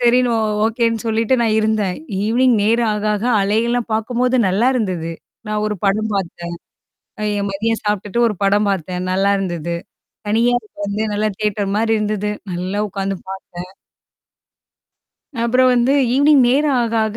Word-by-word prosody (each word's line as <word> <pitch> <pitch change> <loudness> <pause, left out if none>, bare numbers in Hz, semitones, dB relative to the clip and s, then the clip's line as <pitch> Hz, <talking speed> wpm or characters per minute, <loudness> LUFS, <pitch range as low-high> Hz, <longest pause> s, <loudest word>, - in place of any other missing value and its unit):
சரின்னு 245 0 +3
ஒ - - +1 0.3
ஓகேன்னு 230 -1 0
சொல்லிட்டு 225 +3 +1
நான் 220 -2 +2
இருந்தேன். 215 -4 0 0.3
ஈவினிங் 240 +3 +3
நேரம் 230 +2 +2
ஆக 210 0 -3
ஆக 210 - -3 0.2
அலை 205 +2 +1
எல்லாம் 240 -1 -1
பாக்கும்போது, 245 +3 0
நல்லா 210 +7 +2
இருந்தது. 185 -9 -2 0.4
நான் 210 0 -1
ஒரு 210 - -1
படம் 215 +2 +1
பாத்தேன் 175 -2 -4 0.7
அ - - -3 0.2
என் 200 - -1
மதியம் 225 +3 -1
சாப்ட்டுட்டு 210 +2 -1
ஒரு 210 - -2
படம் 205 +1 +3
பாத்தேன். 180 -1 -2
நல்லா 195 +2 +2
இருந்தது. 170 -3 -3 0.5
தனியா 230 +3 +2
அது 215 - -22 0.2
வந்து 200 +1 -2
நல்லா 215 +1 0
தியேட்டர் 205 -2 -1
மாரி 225 +1 +1
இருந்தது. 210 -1 -1 0.2
நல்லா 185 +3 -3
உக்காந்து 195 0 -3 0.2
பாத்தேன் 180 -1 -9 1.7
அப்புறம் 255 +2 +3
வந்து 245 +2 +3 0.2
ஈவினிங் 285 0 +5
நேரம் 285 +3 +2
ஆக 230 -1 -2
ஆக 220 0 -4
215 Hz, 155 wpm, -19 LUFS, 195-235 Hz, 1.7 s, ஈவினிங்